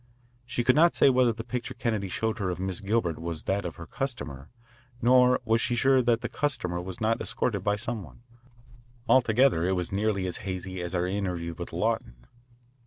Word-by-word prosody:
She 120 Hz, 0 st, -1 dB
could 125 Hz, +1 st, +4 dB
not 170 Hz, +3 st, +5 dB
say 135 Hz, -, +6 dB
whether 125 Hz, -2 st, +4 dB
the 115 Hz, 0 st, -6 dB
picture 125 Hz, 0 st, -5 dB
Kennedy 110 Hz, -6 st, -2 dB
showed 110 Hz, +4 st, -2 dB
her 95 Hz, -3 st, -1 dB
of 90 Hz, -1 st, -3 dB
Miss 95 Hz, -1 st, -2 dB
Gilbert 100 Hz, -5 st, 0 dB
was 85 Hz, -2 st, -4 dB
that 100 Hz, 0 st, -1 dB
of 85 Hz, -, -5 dB
her 85 Hz, -, -9 dB
customer, 80 Hz, -, -5 dB, 0.5 s
nor 125 Hz, +1 st, +5 dB
was 115 Hz, 0 st, +2 dB
she 120 Hz, -, 0 dB
sure 130 Hz, +2 st, +4 dB
that 120 Hz, -1 st, +2 dB
the -, -, -2 dB
customer 90 Hz, -12 st, -2 dB
was 90 Hz, +1 st, -7 dB
not 115 Hz, 0 st, +1 dB
escorted 120 Hz, -6 st, -1 dB
by 105 Hz, 0 st, +2 dB
some 115 Hz, +1 st, -4 dB
one. 80 Hz, -, -14 dB, 0.8 s
Altogether 120 Hz, -6 st, +4 dB
it 95 Hz, +2 st, +1 dB
was 90 Hz, -2 st, -3 dB
nearly 100 Hz, -1 st, 0 dB
as 90 Hz, -, -2 dB
hazy 95 Hz, -1 st, -5 dB
as 85 Hz, +1 st, -4 dB
our 90 Hz, 0 st, +1 dB
interview 90 Hz, -3 st, -2 dB
with -, -, -7 dB
Lawton. -, -, -1 dB
105 Hz, 195 wpm, -27 LUFS, 90-120 Hz, 0.8 s, say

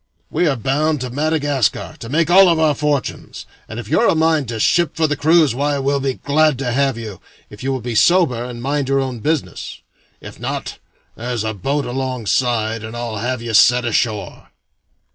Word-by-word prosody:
We 175 Hz, -, +1 dB
are 145 Hz, -, +1 dB
bound 145 Hz, +6 st, 0 dB
to 125 Hz, -1 st, -4 dB
Madagascar, 145 Hz, -3 st, -1 dB
to 115 Hz, -, -8 dB
make 165 Hz, +4 st, +1 dB
all 190 Hz, 0 st, +7 dB
of 165 Hz, -, +2 dB
our 155 Hz, -2 st, +3 dB
fortunes, 145 Hz, -2 st, -3 dB, 0.2 s
and 110 Hz, -, -6 dB
if 115 Hz, -, -8 dB
you're 230 Hz, -, +2 dB
a -, -, +3 dB
mind 160 Hz, -3 st, +2 dB
to 115 Hz, -1 st, -4 dB
ship 170 Hz, +7 st, +2 dB
for 160 Hz, -, +1 dB
the 150 Hz, -1 st, 0 dB
cruise, 155 Hz, -1 st, +3 dB
why, 145 Hz, +3 st, 0 dB
we'll 140 Hz, +1 st, 0 dB
be 135 Hz, -1 st, -2 dB
glad 155 Hz, -1 st, +2 dB
to 130 Hz, -2 st, -2 dB
have 135 Hz, -1 st, +1 dB
you, 110 Hz, -5 st, -8 dB, 0.3 s
if 105 Hz, -, -12 dB
you 135 Hz, -, -2 dB
will 130 Hz, -2 st, -2 dB
be 120 Hz, +1 st, -4 dB
sober 130 Hz, 0 st, +3 dB
and 120 Hz, -1 st, -7 dB
mind 140 Hz, 0 st, -1 dB
your 135 Hz, 0 st, +2 dB
own 130 Hz, -3 st, -3 dB
business; 155 Hz, +4 st, -3 dB, 0.4 s
if -, -, -11 dB
not, -, -, -5 dB, 0.4 s
there 120 Hz, +2 st, -6 dB
is 120 Hz, -3 st, -2 dB
a 110 Hz, 0 st, -2 dB
boat 140 Hz, +8 st, -2 dB
alongside, 120 Hz, -3 st, -1 dB
and 110 Hz, +2 st, -7 dB
I'll 120 Hz, -2 st, -4 dB
have 120 Hz, +2 st, -3 dB
you 115 Hz, -1 st, -4 dB
set 120 Hz, +3 st, +5 dB
ashore." 110 Hz, -4 st, -2 dB
135 Hz, 200 wpm, -19 LUFS, 120-150 Hz, 0.4 s, all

